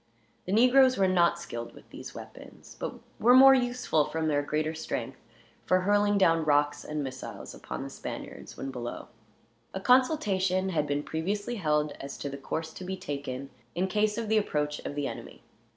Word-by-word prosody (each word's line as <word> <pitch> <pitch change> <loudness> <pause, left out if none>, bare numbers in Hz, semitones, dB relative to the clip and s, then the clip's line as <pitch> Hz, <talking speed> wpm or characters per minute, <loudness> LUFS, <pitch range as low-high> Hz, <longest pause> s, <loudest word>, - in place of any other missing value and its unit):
The 185 - -4
negroes 255 +4 +5
were 195 -1 +3
not 175 -2 +3
skilled 120 -8 -7
with - - -17
these - - -9
weapons; - - -12
but - - -4 0.2
were 245 +3 +6
more 270 +1 +9
useful, 245 - +1
from 160 +1 -2
their 145 -2 +2
greater 155 +2 -1
strength, 160 0 -5 0.5
for 185 0 +3
hurling 205 +1 +3
down 165 -4 +4
rocks 145 -1 +2
and 150 -1 -3
missiles 130 -1 -7
upon - - -6
the - - -6
Spaniards, - - -8
when 135 - -5
below. 120 -2 -6 0.7
A - - -2
consultation 195 - +2
had 150 -5 0
been 145 +1 -1
previously 205 +10 -3
held, 150 -4 +1
as 140 0 -7
to 140 - -4
the 140 - -6
course 160 +3 -4
to - - -8
be 190 +1 -4
taken 140 -6 -5 0.2
in 180 +2 +1
case 210 +2 +1
of 230 -1 -2
the 220 0 +4
approach 150 -7 -2
of 145 - -6
the 145 -1 -1
enemy. - - -9
170 Hz, 185 wpm, -28 LUFS, 145-205 Hz, 0.7 s, more